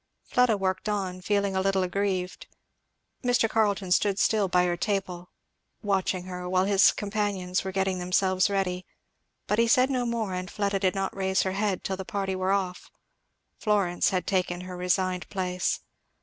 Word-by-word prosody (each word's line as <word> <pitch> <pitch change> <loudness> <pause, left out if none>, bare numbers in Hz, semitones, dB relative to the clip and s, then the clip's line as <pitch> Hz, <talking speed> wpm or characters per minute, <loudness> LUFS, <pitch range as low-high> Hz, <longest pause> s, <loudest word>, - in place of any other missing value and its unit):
Fleda 250 -4 +2
worked 190 +1 -1
on, 190 -3 -2
feeling 200 0 0
a 190 - +2
little 195 0 +1
aggrieved. 185 0 -2 0.8
Mr. 245 -2 +3
Carleton 205 -4 0
stood 195 +1 +3
still 210 -1 +2
by 180 0 +3
her 175 -1 0
table, 180 -2 -3 0.5
watching 190 -2 0
her, 180 -1 -6
while 185 0 +2
his 195 -1 +5
companions 200 -3 -2
were 190 - -4
getting 190 -1 0
themselves 185 +1 +2
ready; 185 -2 -1 0.6
but 210 - 0
he 230 - +4
said 255 +3 +4
no 250 -2 0
more, 225 -5 -2
and 185 0 -4
Fleda 200 -1 -1
did 190 -1 +1
not 195 0 -2
raise 190 0 +1
her 190 - -1
head 200 -1 -1
till 190 - -2
the 190 - -5
party 195 0 -2
were 185 +1 0
off. 190 -2 -2 0.7
Florence 200 -5 +1
had 185 -1 -1
taken 180 -2 -1
her 185 0 -7
resigned 180 0 -1
place. 180 -2 -1
190 Hz, 170 wpm, -27 LUFS, 185-205 Hz, 0.8 s, his